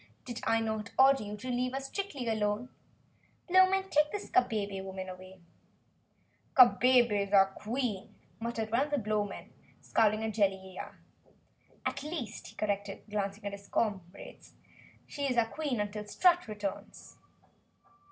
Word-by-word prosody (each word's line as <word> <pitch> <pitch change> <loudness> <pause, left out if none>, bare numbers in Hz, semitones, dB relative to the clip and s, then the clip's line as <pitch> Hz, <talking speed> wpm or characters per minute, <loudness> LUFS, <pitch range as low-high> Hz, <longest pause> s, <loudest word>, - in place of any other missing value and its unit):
"Did 240 -2 -5
I 225 0 +2
not 220 -1 -3
order 270 +1 +6
you 210 0 -6
to 255 - -8
leave 250 +1 -1
us 270 0 -3
strictly 325 -12 -4
alone? 215 +2 0 0.8
Blowmen, 375 +1 +4
take 300 0 +3
this 415 - -6
Kabebe 205 - +1
woman 190 -1 -6
away!" 185 0 -11 1.2
"Kabebe's 240 -5 +5
our 195 -1 +5
Queen," 220 -3 -3 0.2
muttered 225 -1 -3
one 230 - +3
of 290 - 0
the 290 - 0
Blowmen, 210 -3 -3 0.3
scowling 215 0 +2
at 220 -1 -2
Jellia. 190 -3 -1 0.9
"At - - -2
least," 290 -8 -5
he - - -13
corrected, 205 -1 -2
glancing 205 0 -3
at 200 - -2
his 200 0 -10
comrades, 190 -5 -4 0.5
"she 285 -1 -3
is 250 -2 -1
our 225 -1 +3
Queen 290 -7 -2
until 210 0 -3
Strut 355 - +3
returns." 205 -2 -6
220 Hz, 140 wpm, -31 LUFS, 200-255 Hz, 1.2 s, order